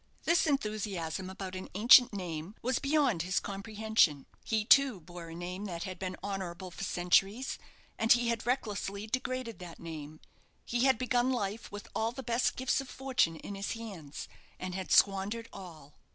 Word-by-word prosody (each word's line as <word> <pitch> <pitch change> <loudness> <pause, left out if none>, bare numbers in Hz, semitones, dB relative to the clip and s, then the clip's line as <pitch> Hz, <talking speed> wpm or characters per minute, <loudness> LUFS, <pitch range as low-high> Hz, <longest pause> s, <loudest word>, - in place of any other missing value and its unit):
This 335 0 +3
enthusiasm 205 - -2
about 190 -1 -6
an 185 - -6
ancient 245 +4 +8
name 180 -1 -5
was 255 +1 +1
beyond 275 - +2
his 180 +2 +1
comprehension. 200 -7 +1 0.2
He 220 -1 0
too, 270 -4 +5
bore 175 0 -10
a 165 - -8
name 180 +3 -5
that 170 -4 -4
had 185 -3 -6
been 185 -1 -4
honourable 190 -2 -4
for 185 - -7
centuries, 195 +7 +1 0.4
and 225 - +2
he 240 -1 +5
had 230 0 -2
recklessly 210 -5 -1
degraded 255 0 -3
that 175 -2 -9
name. 155 -2 -8 0.5
He 240 +2 +1
had 265 -3 +5
begun 250 +1 +1
life 215 -3 -3
with 205 0 -8
all 225 +1 0
the 265 +1 -7
best 240 0 +1
gifts 260 +1 +1
of 270 - -10
fortune 260 -13 +1
in 200 - -7
his 195 0 -3
hands, 195 -11 -7 0.3
and 185 0 -4
had 190 0 -5
squandered 200 +4 +3
all. 160 -7 -11
200 Hz, 170 wpm, -31 LUFS, 180-240 Hz, 0.5 s, ancient